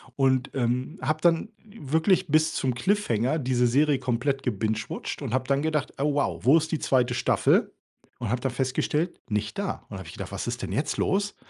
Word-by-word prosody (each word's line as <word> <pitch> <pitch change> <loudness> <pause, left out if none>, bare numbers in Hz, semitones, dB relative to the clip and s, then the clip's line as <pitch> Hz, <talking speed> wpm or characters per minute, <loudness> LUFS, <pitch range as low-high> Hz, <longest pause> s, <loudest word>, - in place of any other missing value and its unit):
und, 130 -1 +2
ähm, 125 +4 -1
habe 155 +4 0
dann 170 +5 +3 0.2
wirklich 180 - +1
bis 155 +1 +3
zum 130 -2 0
Cliffhanger 130 - +1
diese 125 -2 +2
Serie 140 +3 +3
komplett 135 +2 -1
gebingewatcht 110 -2 -3
und - - -4
habe 130 0 0
dann 140 0 +2
gedacht: 155 -2 -1
„Oh 145 +1 +2
wow, 145 - 0
wo 140 +6 +7
ist 160 0 -1
die 160 - 0
2. 125 -2 +2
Staffel?“, - - +2 0.5
und - - -3
habe 125 +2 -1
dann 135 0 -1
festgestellt: 135 +6 -1
„Nicht 105 -1 -2
da.“ 200 -1 -3
Und, - - -30
dann 95 - -6
habe 95 - -9
ich 85 - -9
gedacht: - - -7
„Was - - -3
ist - - -3
denn - - -4
jetzt - - -1
los? 205 +1 0
135 Hz, 205 wpm, -26 LUFS, 125-155 Hz, 0.5 s, wo